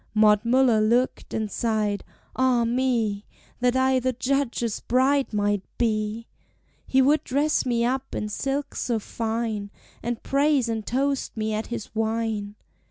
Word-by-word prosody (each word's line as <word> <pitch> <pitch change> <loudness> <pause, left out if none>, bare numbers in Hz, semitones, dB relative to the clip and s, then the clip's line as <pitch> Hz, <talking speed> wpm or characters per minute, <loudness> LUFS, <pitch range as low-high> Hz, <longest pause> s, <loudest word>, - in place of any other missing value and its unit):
Maud 210 -1 +5
Muller 240 -2 +4
looked 240 +4 +1
and 215 -2 -2
sighed: 215 -3 0 0.3
"Ah 255 -2 +3
me! 230 -4 0 0.4
That 245 0 +2
I 260 0 +3
the 255 +1 0
Judge's 250 -3 -1
bride 265 +3 +2
might 205 -1 +1 0.2
be! 220 -1 -1 0.6
"He 265 0 +4
would 295 +3 +3
dress 285 +1 +1
me 235 -1 +1
up 265 +2 -2
in 210 - -2
silks 275 +6 -3
so 235 -2 0
fine, 220 -1 -3 0.3
And 235 0 -4
praise 280 -2 +2
and 225 -1 -2
toast 275 0 -1
me 215 0 -1
at 215 +1 -2
his 235 -3 -6
wine. 220 -2 -2
235 Hz, 145 wpm, -25 LUFS, 215-260 Hz, 0.6 s, Maud